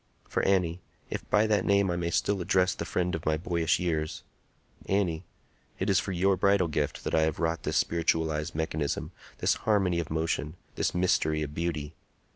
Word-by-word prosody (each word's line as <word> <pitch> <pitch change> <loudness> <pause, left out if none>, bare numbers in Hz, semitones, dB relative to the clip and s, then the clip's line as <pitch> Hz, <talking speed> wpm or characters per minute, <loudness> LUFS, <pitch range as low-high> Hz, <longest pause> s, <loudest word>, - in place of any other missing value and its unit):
For, - - 0
Annie,—if 90 -3 -2
by 105 +1 +4
that 105 -3 +2
name 100 -2 +3
I - - -1
may 85 -1 -1
still 100 +3 0
address 90 +1 +2
the - - -5
friend 90 0 -1
of 80 - -3
my 80 0 +1
boyish 85 0 0
years,—Annie, 85 +2 -3 0.5
it 95 +2 0
is 95 - +4
for 95 - -3
your 95 +2 +2
bridal 100 -2 +3
gift 75 -1 -2
that - - -3
I 80 - +4
have 80 -1 +1
wrought 85 0 -1
this - - -1
spiritualized 80 -2 0
mechanism, 80 -2 -2 0.3
this - - +2 0.2
harmony 95 -5 +3
of 85 - -3
motion, 80 0 -1 0.2
this - - -1
mystery 80 -4 +2
of 75 -1 -6
beauty. 80 -2 -3
85 Hz, 175 wpm, -28 LUFS, 80-95 Hz, 0.5 s, by